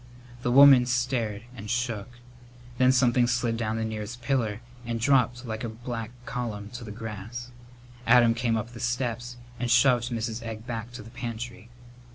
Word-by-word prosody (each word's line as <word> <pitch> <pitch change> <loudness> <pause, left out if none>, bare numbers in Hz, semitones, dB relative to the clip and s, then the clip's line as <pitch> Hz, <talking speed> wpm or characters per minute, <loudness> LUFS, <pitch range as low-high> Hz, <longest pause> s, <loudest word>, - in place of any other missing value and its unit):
The 120 - 0
woman 135 -1 +8
stared 120 -4 -1
and 105 -2 -8
shook. 120 -2 -2 0.6
Then 130 0 +6
something 125 -2 +3
slid 120 -2 0
down 110 -1 -2
the 110 - -1
nearest 110 +2 -5
pillar 115 -4 0 0.2
and 115 -1 -3
dropped 125 -1 +2
like 110 0 -4
a 115 - -2
black 115 0 -5 0.2
column 110 -4 -4
to 120 0 -7
the 110 - -8
grass. 110 +3 -7 0.6
Adam 120 -1 +6
came 115 -1 0
up 110 +2 -4
the 120 - -10
steps 120 -1 -2 0.2
and 125 - -1
shoved 120 0 +4
Mrs. 115 -1 -3
Egg 110 -1 -7
back 115 -1 -5
to 115 - -8
the 115 - -13
pantry. 120 -2 -6
120 Hz, 170 wpm, -27 LUFS, 110-125 Hz, 0.6 s, woman